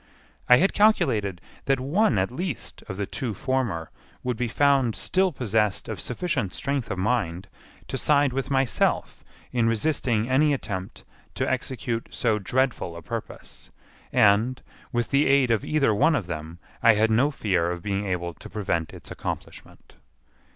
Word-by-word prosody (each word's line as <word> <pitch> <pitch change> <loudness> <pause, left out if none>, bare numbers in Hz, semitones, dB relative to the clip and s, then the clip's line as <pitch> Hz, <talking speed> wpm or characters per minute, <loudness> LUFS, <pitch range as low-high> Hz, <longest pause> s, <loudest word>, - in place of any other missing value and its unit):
I 125 - +9
had 190 +7 +2
calculated 125 - +2 0.2
that 135 -1 +2
one 145 - +2
at 95 +4 0
least 165 - -5
of 95 - -5
the 100 - -1
two 115 +1 -4
former 115 -10 -2 0.3
would 125 -1 -1
be 120 +1 -1
found 135 -1 +2
still 190 0 +2
possessed 110 - 0
of 110 -4 -5
sufficient 125 - -2
strength 140 -3 -2
of 100 - -3
mind 95 -3 -1 0.4
to - - -3
side 145 -3 +3
with 135 +2 -2
myself 135 -8 0 0.3
in 120 -2 +2
resisting 115 -1 +1
any 145 +3 +3
attempt 95 - -6 0.3
to - - -1
execute 120 -2 -2
so 110 -3 0
dreadful 120 -5 -1
a 85 - -10
purpose, - - -7 0.4
and, 110 +5 +3 0.3
with 120 -2 -1
the 140 +1 +3
aid 135 -3 +4
of 110 -3 +1
either 145 -7 +2
one 155 +10 +3
of 120 -10 -1
them, 80 -1 -6 0.2
I 115 -1 +6
had 110 +2 +2
no 125 +6 +4
fear 95 - 0
of 85 -1 -4
being 100 0 -2
able 85 -2 -2
to - - -12
prevent 85 -6 -2
its - - -10
accomplishment. - - -7
115 Hz, 160 wpm, -25 LUFS, 100-135 Hz, 0.4 s, I